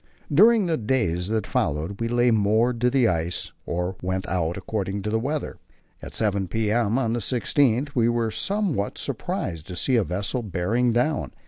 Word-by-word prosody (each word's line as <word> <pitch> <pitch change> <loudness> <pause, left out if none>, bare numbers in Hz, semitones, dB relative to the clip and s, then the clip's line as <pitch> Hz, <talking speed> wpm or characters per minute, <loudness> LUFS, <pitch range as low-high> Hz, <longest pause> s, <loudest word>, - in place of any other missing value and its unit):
During 215 +6 +6
the 165 -2 0
days 105 -7 0
that 110 0 -1
followed 80 +9 -2
we 115 - 0
lay 120 +1 +3
moored 110 +3 +2
to 125 - +4
the 125 -2 +3
ice 85 -1 -2 0.2
or 90 +2 -2
went 95 +1 -2
out, 85 -2 -1
according 100 -2 -3
to 105 - -2
the 110 - +1
weather. 145 +5 -3 0.4
At - - -8
7 100 -3 0
p.m. 110 +3 +1
on 115 -4 0
the 120 - 0
16th 125 +2 +1
we 120 -2 +3
were 120 -1 0
somewhat 195 - -1
surprised 80 -1 -4
to 90 - -6
see 125 +8 +1
a 115 - +3
vessel 100 - -2
bearing 110 +4 0
down. 125 +7 0
110 Hz, 180 wpm, -24 LUFS, 95-125 Hz, 0.4 s, During